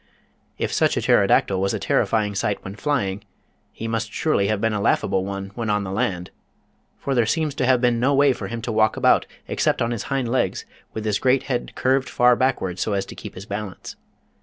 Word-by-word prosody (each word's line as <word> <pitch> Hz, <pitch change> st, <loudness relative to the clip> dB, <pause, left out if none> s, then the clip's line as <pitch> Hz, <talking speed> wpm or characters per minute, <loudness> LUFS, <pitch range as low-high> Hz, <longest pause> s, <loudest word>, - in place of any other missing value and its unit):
If -, -, -2 dB
such -, -, +2 dB
a -, -, +1 dB
Pterodactyl 95 Hz, -1 st, +3 dB
was 95 Hz, 0 st, 0 dB
a -, -, -3 dB
terrifying 105 Hz, -2 st, +1 dB
sight 100 Hz, +1 st, -2 dB
when 95 Hz, +1 st, -7 dB
flying, 105 Hz, -7 st, -1 dB, 0.5 s
he 115 Hz, -, -6 dB
must 115 Hz, -1 st, -2 dB
surely 100 Hz, -11 st, +1 dB
have 110 Hz, -1 st, 0 dB
been 115 Hz, +1 st, 0 dB
a 105 Hz, -, -1 dB
laughable 95 Hz, -1 st, +1 dB
one 100 Hz, 0 st, -5 dB
when 115 Hz, -1 st, -3 dB
on 105 Hz, -1 st, +1 dB
the 95 Hz, -, -5 dB
land. 95 Hz, -5 st, -2 dB, 0.7 s
For 140 Hz, -, -2 dB
there 120 Hz, -4 st, +2 dB
seems 155 Hz, +2 st, 0 dB
to 125 Hz, -, -1 dB
have 130 Hz, -2 st, +4 dB
been 120 Hz, -2 st, +2 dB
no 130 Hz, +4 st, +2 dB
way 140 Hz, -1 st, +5 dB
for -, -, -6 dB
him 115 Hz, -1 st, -6 dB
to 120 Hz, -, -2 dB
walk 110 Hz, 0 st, +2 dB
about -, -, +3 dB, 0.2 s
except -, -, 0 dB
on 115 Hz, 0 st, 0 dB
his 115 Hz, -4 st, -3 dB
hind 135 Hz, -3 st, 0 dB
legs, 125 Hz, +2 st, -1 dB, 0.3 s
with 110 Hz, -1 st, -5 dB
his 105 Hz, -2 st, +1 dB
great 130 Hz, +1 st, +2 dB
head 125 Hz, -3 st, -3 dB
curved 130 Hz, +1 st, +1 dB
far 125 Hz, 0 st, +4 dB
backward 115 Hz, -9 st, -1 dB
so 105 Hz, -, -1 dB
as 100 Hz, -1 st, -1 dB
to -, -, -10 dB
keep -, -, -9 dB
his 95 Hz, -, -8 dB
balance. 100 Hz, -3 st, -6 dB
110 Hz, 220 wpm, -22 LUFS, 100-125 Hz, 0.7 s, way